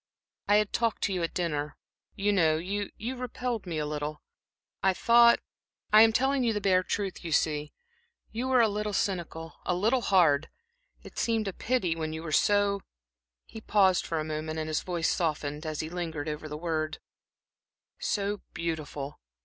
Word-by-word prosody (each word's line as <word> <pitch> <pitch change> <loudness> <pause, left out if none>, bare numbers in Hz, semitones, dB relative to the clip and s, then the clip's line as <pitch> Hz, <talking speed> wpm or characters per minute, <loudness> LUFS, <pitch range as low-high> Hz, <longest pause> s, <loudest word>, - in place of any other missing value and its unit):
I 205 - +5
had 210 -1 +2
talked 230 -2 0
to 200 - +1
you 180 - -1
at 165 - -3
dinner, 150 -4 -2 0.4
you 205 +1 +1
know, 160 -5 +3
you 200 +4 -3
you 240 +5 -4
repelled 245 -4 -4
me 165 -3 -3
a 150 - -1
little. 150 0 -4 0.6
I 190 -1 +3
thought 235 +2 +6 0.5
I 215 - +9
am 225 0 +7
telling 265 +3 +2
you 230 -2 +2
the 210 - -1
bare 190 -2 +3
truth, 195 +1 -3
you 165 - -5
see 150 -1 +1 0.6
you 240 +3 -3
were 255 -2 +4
a 225 - +5
little 210 0 -2
cynical, 170 -4 -2
a 180 - 0
little 225 +8 +2
hard 165 -8 +3 0.5
it - - -8
seemed 225 -2 +1
a 195 - -3
pity 205 -9 0
when 155 -1 -3
you 160 +1 -5
were 160 - -5
so" 205 +3 +3 0.6
he 220 - -10
paused 195 -4 +3
for 165 - -1
a - - -1
moment 155 0 -4
and 155 0 -2
his 155 - 0
voice 175 -3 -1
softened 150 -2 -1
as 155 -1 -2
he 155 - -5
lingered 165 -4 -4
over 155 0 -4
the 150 - -5
word 155 -1 -2 1.0
"so 205 0 -1
beautiful. 155 -4 -4
180 Hz, 180 wpm, -29 LUFS, 155-210 Hz, 1.0 s, I